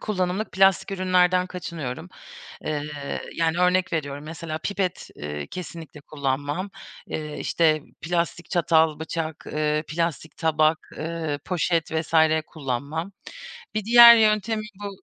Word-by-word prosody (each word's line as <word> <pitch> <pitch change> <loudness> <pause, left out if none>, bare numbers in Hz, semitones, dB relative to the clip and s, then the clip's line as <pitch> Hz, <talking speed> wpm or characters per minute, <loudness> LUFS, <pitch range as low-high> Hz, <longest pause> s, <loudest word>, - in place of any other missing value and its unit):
kullanımlık 190 +1 -2
plastik 195 +1 +3
ürünlerden 185 -1 +2
kaçınıyorum, 165 -4 -6 0.6
eee, 150 -1 -3 0.4
yani, 165 0 +1
örnek 180 0 +2
veriyorum, 145 -2 -3
mesela, 160 0 -5
pipet, 190 +2 -3
eee, 75 0 -6
kesinlikle 165 -5 -8
kullanmam. 145 +6 -3 0.4
Eee, 150 -1 -5
işte, 155 -2 +2 0.2
plastik 170 0 -2
çatal, 160 -3 +3
bıçak, 160 -1 -4
eee, 150 0 0
plastik 165 0 -3
tabak, 155 0 +1
eee, 160 -2 -3
poşet 170 -2 0
vs. 160 0 -3 0.3
kullanmam. 150 +5 -4 0.6
Bir 215 -2 -1
diğer 235 +1 +10
yöntemi 215 0 +2 0.2
bu 205 - -3
165 Hz, 115 wpm, -24 LUFS, 155-180 Hz, 0.6 s, diğer